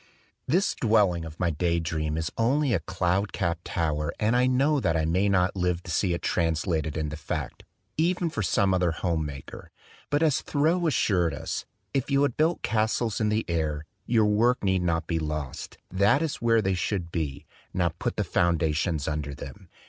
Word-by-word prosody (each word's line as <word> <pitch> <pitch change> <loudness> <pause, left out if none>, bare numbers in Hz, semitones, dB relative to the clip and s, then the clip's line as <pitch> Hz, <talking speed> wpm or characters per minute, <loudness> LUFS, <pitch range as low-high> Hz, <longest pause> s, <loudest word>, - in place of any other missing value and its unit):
This 185 +5 +2
dwelling 100 -7 +2
of 80 -1 -10
my 85 -2 +1
day 85 +2 0
dream 80 -1 -2
is 80 +1 -2
only 130 +3 +2
a 95 - +2
cloud 90 +4 -1
capped 85 -3 -2
tower 75 -2 -1
and 110 +2 +2
I 125 +1 +4
know 140 +4 +3
that 85 -8 +1
I 80 - +1
may 95 +5 +2
not 90 -1 +2
live 90 -2 0
to 85 - -6
see 85 +2 +1
it - - -7
translated 80 -2 0
into 75 -1 -2
fact, 75 - -5 0.3
even 170 +1 +1
for 110 - -2
some 95 +1 +2
other 90 -1 +2
home 80 -2 -1
maker. 70 -2 -9 0.4
But 145 +2 +2
as 155 -2 +2
Thoreau 165 +4 +1
assured 90 - +2
us, - - -4 0.3
"If 135 0 -1
you 140 0 +3
have 140 -5 +1
built 160 +3 +1
castles 110 0 0
in 105 - +2
the 110 +1 0
air, 80 -2 -1 0.2
your 110 -2 +4
work 115 +4 +2
need 95 -2 +2
not 85 -1 0
be 85 -2 -1
lost; 75 -3 -5
that 100 - +3
is 155 -2 -2
where 115 -1 +3
they 95 0 +1
should 90 -1 -2
be. 75 -6 -3 0.3
Now 90 -2 +1
put 80 - -4
the - - 0
foundations 80 -2 +1
under 75 -2 -3
them." 95 +7 -10
90 Hz, 190 wpm, -27 LUFS, 80-115 Hz, 0.4 s, I